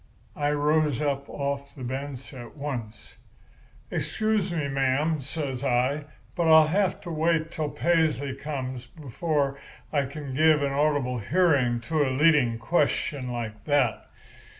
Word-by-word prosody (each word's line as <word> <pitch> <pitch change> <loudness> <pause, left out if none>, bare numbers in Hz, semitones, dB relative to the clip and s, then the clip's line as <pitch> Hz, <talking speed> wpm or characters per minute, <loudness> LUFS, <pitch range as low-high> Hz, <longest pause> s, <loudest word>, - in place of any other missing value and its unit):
"I 145 0 0
rose 150 -1 +2
up 140 -2 -1
off 140 0 -4
the 130 - -8
bench 135 +2 -5
at 120 +1 -10
once. 120 -7 -6 0.7
"'Excuse 215 -4 0
me, 160 -4 -1
ma'am,' 135 +3 +1
says 140 -2 -4
I, 135 +3 +1 0.3
'but 170 - 0
I'll 160 -1 +8
have 190 +2 +1
to 175 - -7
wait 165 0 +1
till 155 -2 -2
Paisley 155 -5 +1
comes 130 -3 -5
before 140 0 -2 0.3
I 140 -2 +2
can 140 0 -7
give 155 +1 +4
a 140 - 0
audible 140 -3 +1
hearing 130 - +2
to 150 +6 0
leading 135 -4 +3
questions 140 0 0
like 115 -3 -5
that. 140 -7 +1
145 Hz, 135 wpm, -26 LUFS, 130-155 Hz, 0.7 s, I'll